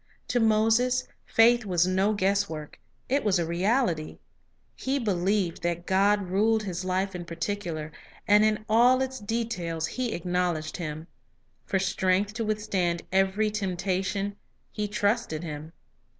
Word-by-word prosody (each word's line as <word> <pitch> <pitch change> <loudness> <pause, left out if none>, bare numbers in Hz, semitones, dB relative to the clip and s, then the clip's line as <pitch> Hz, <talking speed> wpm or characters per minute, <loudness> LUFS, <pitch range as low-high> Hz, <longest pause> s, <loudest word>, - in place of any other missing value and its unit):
To 245 - +2
Moses 225 +3 +3 0.2
faith 235 +1 +5
was 180 -4 +2
no 190 +3 +2
guesswork; 195 -6 -1 0.3
it 280 +3 +1
was 200 -3 +2
a 170 - 0
reality. 175 -1 0
Power - - -21 0.6
He 270 +2 -1
believed 195 -5 0
that 170 0 -2
God 200 +1 +2
ruled 215 +4 +2
his 185 -3 -4
life 185 +1 -1
in 180 -1 -5
particular; 170 -2 -4 0.4
and 210 +1 +6
Fajtll - - +5
in 215 0 -1
all 245 +4 +5
its 260 0 -5
details 205 -7 -2
he 245 +6 -3
acknowledged 175 -2 -1
Him. 155 -2 -5 0.6
For 195 - +1
strength 190 +1 +1
to 230 +1 -3
withstand 200 -5 -1
every 195 +3 +2
temptation, 195 0 -2 0.3
he 210 -1 -2
trusted 205 -5 0
in 170 - -5
Him. 150 +2 -8
195 Hz, 145 wpm, -27 LUFS, 175-215 Hz, 0.6 s, and